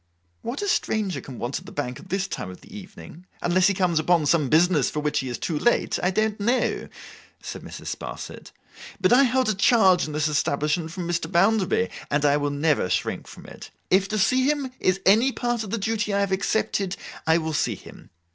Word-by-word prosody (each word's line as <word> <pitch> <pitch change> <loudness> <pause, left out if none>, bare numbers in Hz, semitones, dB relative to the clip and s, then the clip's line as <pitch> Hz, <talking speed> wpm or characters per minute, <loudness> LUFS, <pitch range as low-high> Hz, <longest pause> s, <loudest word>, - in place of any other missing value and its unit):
'What 250 - -4
a - - -2
stranger 215 - 0
can 130 -3 -10
want 120 +3 -3
at - - -16
the - - -9
Bank 125 -4 -4
at 185 - -14
this 195 0 -1
time 95 - -5
of 90 - -11
the - - -14
evening, 185 -3 -12
unless 180 +1 +3
he 200 - +1
comes 180 -4 +1
upon 165 0 +2
some 145 -2 +2
business 160 -3 +3
for 150 - -3
which 150 0 0
he 130 - -4
is 120 - -4
too 155 -4 -2
late, 240 - +1
I 180 - +2
don't 215 +2 0
know,' 240 +5 0 0.5
said - - -7
Mrs. - - -6
Sparsit, - - -8 0.5
'but 185 +3 +3
I 270 +3 +6
hold 255 -1 +1
a - - +2
charge 195 -3 +4
in 150 - -6
this 155 +1 +1
establishment 150 +2 0
from 175 0 -5
Mr. 175 -1 -2
Bounderby, 200 +4 +2 0.2
and 145 +1 +1
I 145 0 +4
will 145 0 -1
never 145 - +1
shrink 90 - -2
from - - -12
it. - - -11 0.2
If 190 +1 +4
to 215 - -2
see 255 +6 +3
him 285 -3 -1
is 185 +1 +1
any 225 +7 +5
part 240 -3 -2
of 210 - -7
the 230 - -1
duty 215 -1 -1
I 200 - +2
have 200 -1 -1
accepted, 195 -1 0 0.3
I 160 +1 +5
will 160 -1 -2
see 145 - 0
him. - - -14
185 Hz, 220 wpm, -24 LUFS, 155-215 Hz, 0.5 s, I